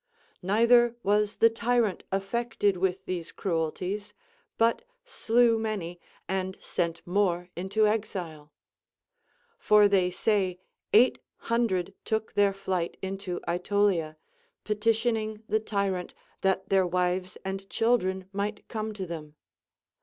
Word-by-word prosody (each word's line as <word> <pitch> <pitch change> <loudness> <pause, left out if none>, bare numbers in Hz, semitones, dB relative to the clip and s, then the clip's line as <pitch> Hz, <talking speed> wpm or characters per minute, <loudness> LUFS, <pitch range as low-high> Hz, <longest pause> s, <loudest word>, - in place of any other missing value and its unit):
Neither 235 +5 +4
was 210 +1 +2
the 230 - +5
tyrant 230 -3 0
affected 205 +1 0
with 185 +1 -1
these 175 -2 -4
cruelties, 190 +4 -3 0.4
but 230 - +3 0.2
slew 235 - +2
many 195 -6 -3 0.3
and 190 0 -2
sent 170 -1 -3
more 180 -1 0
into 190 +5 +1
exile; 180 -8 -3 1.1
for 210 -1 +6
they 190 -3 +3
say 185 -1 0 0.3
eight 240 +4 +5 0.3
hundred 200 -6 +1
took 220 0 -2
their 200 -1 +4
fliglit 190 -3 -2
into 190 -1 -4
Aetolia, 175 -3 +1 0.5
petitioning 220 0 0
the 215 +1 +2
tyrant 200 -4 -2 0.3
that 190 0 0
their 190 -2 +3
wives 180 +1 -1
and 195 0 -5
children 190 -5 +1
might 205 +1 -3
come 215 -1 -4
to 190 -2 -4
them. 155 -3 -8
195 Hz, 115 wpm, -28 LUFS, 180-220 Hz, 1.1 s, for